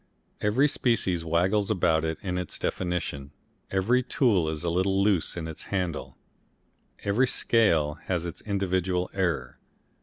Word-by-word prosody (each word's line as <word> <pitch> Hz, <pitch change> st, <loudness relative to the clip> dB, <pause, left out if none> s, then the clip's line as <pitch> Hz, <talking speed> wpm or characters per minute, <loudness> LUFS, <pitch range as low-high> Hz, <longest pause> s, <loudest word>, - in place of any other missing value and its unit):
Every 115 Hz, +8 st, +3 dB
species 105 Hz, -, 0 dB
waggles 90 Hz, +5 st, +1 dB
about 85 Hz, -6 st, +2 dB
in 90 Hz, +3 st, -2 dB
its 90 Hz, -, -5 dB
definition, 85 Hz, -6 st, -3 dB, 0.4 s
every 110 Hz, +7 st, +2 dB
tool 110 Hz, -, +2 dB
is 80 Hz, 0 st, -4 dB
a 85 Hz, -, 0 dB
little 95 Hz, +2 st, +2 dB
loose 100 Hz, -5 st, +1 dB
in 80 Hz, -2 st, -4 dB
its 80 Hz, -, -7 dB
handle, 90 Hz, -5 st, -3 dB, 0.9 s
every 110 Hz, +6 st, +2 dB
scale 80 Hz, -12 st, +2 dB
has 90 Hz, -2 st, -1 dB
its 85 Hz, -, -6 dB
individual 95 Hz, -3 st, -1 dB
error. 85 Hz, -10 st, -1 dB
90 Hz, 130 wpm, -27 LUFS, 85-100 Hz, 0.9 s, Every